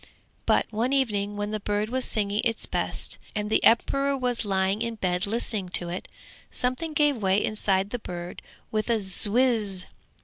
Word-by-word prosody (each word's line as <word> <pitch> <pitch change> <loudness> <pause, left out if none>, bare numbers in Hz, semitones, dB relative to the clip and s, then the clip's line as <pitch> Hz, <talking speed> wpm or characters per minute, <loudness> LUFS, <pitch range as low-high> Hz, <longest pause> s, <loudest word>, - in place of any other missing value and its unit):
But - - +4
one 235 +5 0
evening 205 -6 0
when 205 0 -2
the 215 - -2
bird 205 +1 -1
was 255 +1 0
singing 205 -1 0
its 230 -2 +2
best, - - -3 0.2
and 210 0 -2
the - - +3
emperor 275 +4 +3
was 250 -3 -1
lying 195 +1 +1
in 230 -1 -2
bed 180 -1 -1
listening 210 -3 -2
to 175 - -5
it, 180 +2 -5 0.4
something 255 +6 -1
gave 295 -3 +3
way 195 -1 +2
inside 200 -2 0
the 245 - -3
bird 175 -3 -7 0.3
with 215 +1 -1
a 230 - +4 0.3
'whizz.' 215 -6 +2
215 Hz, 170 wpm, -26 LUFS, 200-245 Hz, 0.4 s, But